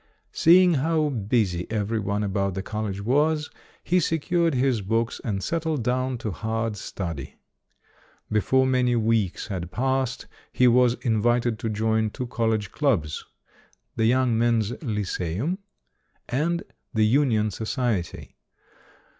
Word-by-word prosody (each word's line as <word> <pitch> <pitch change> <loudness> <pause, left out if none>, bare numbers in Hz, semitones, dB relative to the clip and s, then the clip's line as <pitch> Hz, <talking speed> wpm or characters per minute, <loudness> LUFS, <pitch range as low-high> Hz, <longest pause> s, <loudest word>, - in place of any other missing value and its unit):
Seeing 180 +2 +6
how 155 0 +1
busy 105 -7 0
every 110 +1 -1
one 100 +1 -1
about 100 -2 -1
the 95 - -3
college 105 -3 -4
was, 150 +6 +1 0.3
he 180 +1 +2
secured 165 0 +1
his 125 -3 +1
books 115 +4 -1
and 100 -5 -2
settled 160 - -1
down 130 +1 0
to 110 - 0
hard 110 +4 -2
study. 85 -7 -6 1.0
Before 130 +5 +3
many 125 -2 +2
weeks 110 -4 0
had 90 -4 -4
passed, 130 +4 -1 0.3
he 125 - +4
was 125 0 +4
in 110 -3 +1
vited 120 -1 +1
to 115 - -2
join 110 0 +1
two 125 - -5
college 110 -4 -1
clubs 100 - 0 0.7
"The 110 - +1
Young 125 -1 +3
Men's 115 -2 +2
Lyceum" 105 - -2 0.7
and 170 +7 0 0.3
"The 110 -1 +4
Union 110 -3 +2
Society". 110 -3 -3
115 Hz, 130 wpm, -25 LUFS, 105-130 Hz, 1.0 s, Seeing